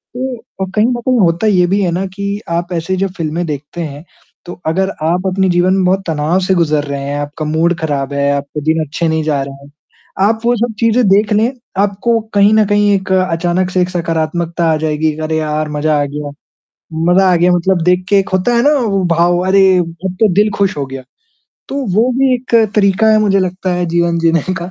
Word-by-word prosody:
तो 255 -1 -3 0.2
अ, - - +1
कहीं 210 +1 +3
न 250 - 0
कहीं 255 -2 +3
होता 175 +3 +2
ये 180 -4 +3
भी 200 +2 +1
है 175 - 0
ना 185 +3 -2
कि, 200 +2 -5
आप 175 +1 -2
ऐसे 170 +3 -2
जो 195 +1 0
फ़िल्में 165 +2 -2
देखते 150 +3 -6
हैं, 150 -1 -6 0.4
तो 175 - -7
अगर 190 +4 0
आप 180 +4 0
अपने 190 0 +1
जीवन 175 +1 +2
में 190 -1 +1
बहुत 190 +1 +1
तनाव 160 +3 0
से 190 - +2
गुज़र 155 -3 +1
रहे 140 -1 -4
हैं, 145 +1 -3
आपका 145 +1 -5
मूड 165 +3 +1
ख़राब 140 -3 -2
है, 140 0 +1
आपके 140 +1 -5
दिन 160 0 0
अच्छे 165 +4 -2
नहीं 160 -1 0
जा 145 -3 0
रहे 135 0 -8
हैं, 140 - -16 0.6
आप 225 0 0
वो 240 0 +3
सब 235 0 -1
चीज़ें 230 -1 +2
देख 205 +2 +3
लें, 225 +4 +2 0.3
आपको 205 +3 0 0.2
कहीं 200 +1 +5
न 215 -1 +4
कहीं 205 0 +2
एक 190 0 -4
अचानक 180 0 0
से 185 - +1
एक 180 - 0
सकारात्मकता 165 0 -1
आ - - 0
जाएगी, 155 0 -1
अरे 160 0 -1
यार 155 0 -2
मज़ा 150 0 +1
आ - - 0
गया, 145 0 -6 0.8
मज़ा 190 0 +4
आ - - +4
गया, 175 +2 +3
मतलब 175 0 +1
देख 180 0 +2
के 200 - +4
एक 195 - -1
होता 185 +6 +1
है 235 - +3
ना, 295 +2 +4
वो 200 -5 0
भाव 175 +1 +2
अरे! 190 -1 +4
अब 175 +2 -4
तो 220 - +5
दिल 210 +1 +3
खुश 195 -5 +1
हो 140 - -2
गया, 135 0 -8 0.7
तो - - -6 0.2
वो 230 +4 +3
भी 270 -1 +3
एक 245 -1 -4 0.2
तरीक़ा 200 +2 +3
है 215 - +4
मुझे 195 -2 +2
लगता 185 0 -2
है 175 0 -1
जीवन 170 0 0
जीने 165 -1 +2 0.2
का 175 +2 -6
180 Hz, 225 wpm, -14 LUFS, 160-200 Hz, 0.8 s, कहीं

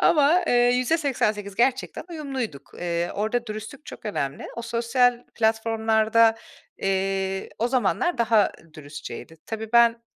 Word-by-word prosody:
Ama, 310 +4 +4
eee, - - +2
%88 245 -4 +1
gerçekten 255 +4 0
uyumluyduk. 265 - -5
Eee, 170 0 -1
orada 220 +4 -1
dürüstlük 215 +6 -8
çok - - -10
önemli. 140 -9 -3
O 235 - -4
sosyal 240 +1 +1
platformlarda, 225 0 +3 0.4
eee, 195 0 -1
o 235 +2 +1
zamanlar 265 +6 +1
daha 225 -2 +3 0.2
dürüstçeydi. 155 +2 -9
Tabii, 220 0 -5
ben, 235 -1 +5
225 Hz, 120 wpm, -24 LUFS, 205-245 Hz, 0.4 s, ben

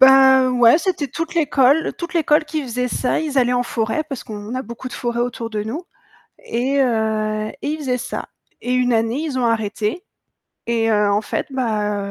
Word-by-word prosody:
Ben, 265 -1 +7
ouais, 245 +3 +6
c'était 350 -5 -1
toute 330 +5 -5
l'école 295 -1 +3
toute 345 +1 -6
l'école 305 -2 +3
qui 310 0 -3
faisait 250 -1 -2
ça, 250 - 0
ils 300 -3 -1
allaient 245 -1 +3
en 245 0 +2
forêt 230 +4 -1
parce 275 -4 -6
qu'on 210 +2 -7
a 255 - -2
beaucoup 235 +1 -8
de - - -13
forêts 240 -1 -2
autour 240 -1 -3
de 210 -2 -2
nous 255 - -5 0.5
et 260 +4 -1
heu, 215 -3 0
et - - -3
ils 305 +1 -2
faisaient 260 -4 -1
ça. - - -5 0.3
Et 245 - -2
une 250 -1 +2
année, 225 +2 +1
ils 300 -5 -3
ont 250 - +1
arrêté 220 - -1 0.6
et 230 -1 +1
heu, 210 -1 +3
en 205 +1 +2
fait, - - -3
bah, 215 -5 -1
250 Hz, 200 wpm, -20 LUFS, 225-275 Hz, 0.6 s, Ben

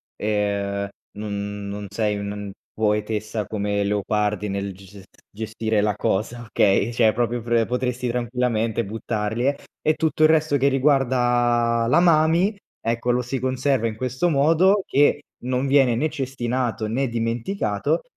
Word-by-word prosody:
ehm, 100 -1 -1 0.3
non 100 -1 -4
non 100 0 -5
sei 105 0 -1
un 100 0 -5 0.2
poetessa 105 0 -1
come 100 -1 -1
Leopardi 105 0 0
nel 100 0 -3
ges 95 +1 -15
es 95 -2 -12 0.2
gestire 110 0 -2
la 105 -1 +1
cosa, 110 +4 -1
okay, 105 +1 +2
cioè 110 -2 +3
proprio 120 +1 -1
pre 115 0 +1
potresti 125 0 -2
tranquillamente 120 -2 -1
buttarle. 110 +5 -2 0.2
E 155 0 +2
tutto 160 -1 -1
il 155 - +7
resto 155 -2 +3
che 140 +1 +2
riguarda 120 -4 +2
la 125 - +5
mami, 170 +4 +3 0.2
ecco 115 +1 -2
lo 125 +1 +2
si 130 +2 -3
conserva 130 -1 0
in 110 - -4
questo 130 +8 -1
modo 165 +7 +4
che 145 +1 +3 0.2
non 130 +1 0
viene 135 -3 +4
né 155 +6 0
cestinato 125 -4 -2
né 125 +6 0
dimenticato, 115 - -1
115 Hz, 140 wpm, -23 LUFS, 105-130 Hz, 0.3 s, il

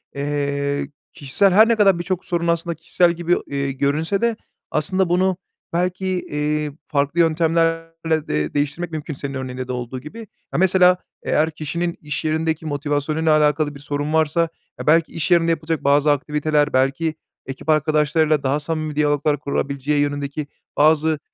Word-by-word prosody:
Eee, 140 0 -2 0.2
kişisel 150 +8 +2
her 215 +4 +7
ne 230 - +3
kadar 195 -5 +4
birçok 180 +1 -3
sorun 170 -1 -1
aslında 170 0 0
kişisel 170 +2 +2
gibi, 175 +1 +1
eee, 140 -1 -2
görünse 150 +8 0
de 235 -1 +1 0.4
aslında 185 +4 0
bunu 185 +1 +2 0.4
belki, 180 +2 -1
eee, 150 -4 -1 0.2
farklı 145 +2 0
yöntemlerle 165 -1 +1
de 75 0 -1
değiştirmek 145 +4 -2
mümkün 155 -1 -5
senin 140 0 -6
örneğinde 130 -1 -5
de - - -4
olduğu 125 +1 -4
gibi. 150 - -10 0.3
Ya, - - 0
mesela 185 -1 +5 0.3
eğer 160 +1 +1
kişinin 170 +3 -3
iş 150 0 -4
yerindeki 160 0 -1
motivasyonuyla 150 +1 0
alakalı 150 0 +1
bir - - -10
sorun 145 +1 -3
varsa, 160 +1 +2 0.3
e, - - -8
belki 160 +1 +4
iş 165 +2 -2
yerinde 170 -1 +4
yapılacak 160 -1 -2
bazı 145 +1 +4
aktiviteler, 150 +1 0
belki 135 +5 +1 0.3
ekip 135 +4 -8
arkadaşlarıyla 155 0 +2
daha 135 +2 +1
samimi 155 0 -3
diyaloglar 145 0 +1
kurabileceği 140 0 -1
yönündeki 145 0 -2 0.3
bazı, 155 +1 +3
155 Hz, 150 wpm, -21 LUFS, 145-165 Hz, 0.4 s, her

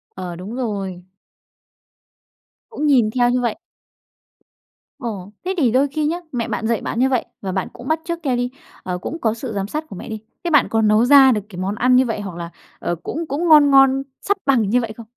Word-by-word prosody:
Ờ, 180 -2 -6
đúng 195 +6 -7
rồi. 195 -7 -4 1.7
Cũng 305 -9 -2
nhìn 245 -7 +4
theo 245 0 +2
như 250 0 +1
vậy? 235 -3 -1 1.4
Ồ. 210 -6 -6
Thế 380 +1 -1
thì 255 -7 +3
đôi 270 +3 +3
khi 300 +2 -1
nhá, 335 +3 0 0.2
mẹ 235 -2 -2
bạn 220 - -2
dạy 230 0 0
bạn 230 - -4
như 260 +1 +4
vậy 255 -3 0 0.2
và 190 -2 -4
bạn 190 0 -2
cũng 245 - -10
bắt 315 0 +1
chước 340 -1 -3
theo 260 -5 0
đi, 245 0 -1 0.3
ờ, 180 -1 -3
cũng 320 - -5
có 225 -5 0
sự 235 0 -6
giám 195 -1 -2
sát 305 +8 -4
của - - -9
mẹ - - -8
đi, 220 -1 -5 0.2
thế 345 - -1
bạn 295 -4 +4
có 225 0 +1
nấu 215 +2 +4
ra 270 -1 +7
được 210 - 0
cái 185 - -11
món 195 +2 -2
ăn 250 +3 +3
như 260 - +5
vậy 225 -4 -3
hoặc 195 -4 -6
là, 170 0 -6 0.3
ờ, 175 - -2
cũng 330 +1 -4
cũng 310 +6 -1
ngon 300 -3 +7
ngon 270 0 +5 0.2
sắp 405 - 0
bằng 230 -7 +3
như 250 +2 +3
vậy 230 -2 -4
không? 230 -2 -10
245 Hz, 235 wpm, -20 LUFS, 210-275 Hz, 1.7 s, ra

